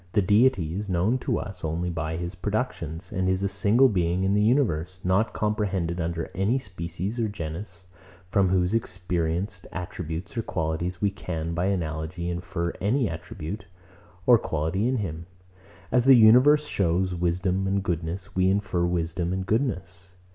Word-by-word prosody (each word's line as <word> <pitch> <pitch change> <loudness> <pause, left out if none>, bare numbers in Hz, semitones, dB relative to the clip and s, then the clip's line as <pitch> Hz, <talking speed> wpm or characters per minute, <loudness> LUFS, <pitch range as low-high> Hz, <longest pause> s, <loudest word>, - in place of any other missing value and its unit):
The 105 - +4
Deity 105 -5 +3
is 100 +2 -4
known 95 +8 +1
to - - -1
us 95 -4 -6
only 85 +3 -1
by 80 -1 -3
his 85 +1 -4
productions, 90 -4 -3
and 95 +1 0
is 95 +1 +1
a - - +2
single 105 +7 +4
being 90 -3 0
in 95 +1 +2
the 105 - +3
universe, 95 - +1
not 95 +5 +2
comprehended 95 -5 -1
under 85 0 -2
any 100 +8 +1
species 90 0 -4
or 115 - +1
genus, 90 0 -6 0.5
from 100 -3 +3
whose 90 +1 +2
experienced 90 -1 -2
attributes 85 -1 -5
or 115 - 0
qualities, 85 0 -3
we 100 - +3
can, 85 -4 -4
by 90 +3 0
analogy, 85 -1 -2
infer 85 0 -3
any 120 +5 +2
attribute 80 +3 -6 0.6
or 120 -2 +7
quality 80 +8 -1
in 130 0 +1
him. 85 -5 -4 0.6
As 125 -1 +3
the 135 -1 +9
universe 125 +7 +7
shews 90 - 0
wisdom 90 +2 0
and 100 0 0
goodness, 85 0 -3
we 95 0 +3
infer 95 -3 +1
wisdom 85 0 -1
and 95 0 -2
goodness. 95 -6 -2
90 Hz, 160 wpm, -26 LUFS, 85-105 Hz, 0.6 s, the